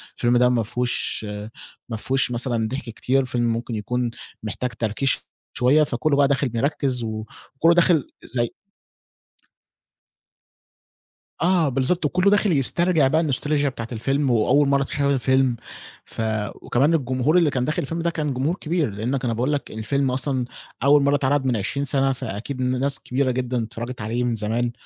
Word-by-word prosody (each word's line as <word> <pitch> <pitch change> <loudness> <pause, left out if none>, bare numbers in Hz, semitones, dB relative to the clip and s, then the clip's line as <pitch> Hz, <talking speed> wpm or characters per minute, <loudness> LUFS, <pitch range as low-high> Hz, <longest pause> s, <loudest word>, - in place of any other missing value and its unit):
الفيلم 120 0 +2
ده 125 0 +5
ما 120 -2 +1
فيهوش 120 0 -2 0.6
ما 115 - -3
فيهوش 130 +2 0
مثلًا 120 -2 -1
ضحك 130 +5 -4
كتير، 130 +4 0
فيلم 120 -2 0
ممكن 115 0 -4
يكون 120 +3 -2 0.3
محتاج 120 +3 -3
تركيز 115 +4 -1 0.5
شوية، 140 +5 +4
فكله 140 +1 0
بقى 140 -1 +5
داخل 140 -1 +1
مركِّز 130 0 0
وكله 115 +8 -1
داخل 170 -5 +3
زي 120 -1 -2 2.9
آه، 170 -3 +3
بالضبط، 135 +6 +1
وكله 180 +6 +3
داخل 205 -1 +3
يسترجع 160 +1 +2
بقى 155 +5 +2
الnostalgia 145 0 0
بتاعة 115 -4 -4
الفيلم 135 +4 0
وأول 130 +5 +3
مرة 140 0 +3
أتخيل 140 +1 0
الفيلم، 130 -1 +2 0.5
ف - - -6 0.3
وكمان 140 +7 +1
الجمهور 130 +1 +2
اللي 170 -4 +4
كان 125 -3 -1
داخل 155 - -1
الفيلم 165 +4 -3
ده 170 - +1
كان 155 -4 -2
جمهور 135 +7 0
كبير، 165 - -1
لأنك 120 +6 -2
أنا 115 - 0
باقول 125 +6 0
لك 145 - -3
الفيلم 130 +5 -1
أصلًا 130 -1 -1 0.4
أول 140 +1 +5
مرة 140 +1 +3
اتعرض 140 0 +1
من 125 -2 +1
عشرين 140 +7 -2
سنة، 135 0 +2
فأكيد 130 +1 -5
ن 125 0 0
ناس 140 +1 +1
كبيرة 130 +1 0
جدًا 125 -1 -1
اتفرجت 120 +2 -6
عليه 115 +4 -1
من 120 -1 0
زمان، 115 +3 -1
130 Hz, 160 wpm, -23 LUFS, 120-145 Hz, 2.9 s, ده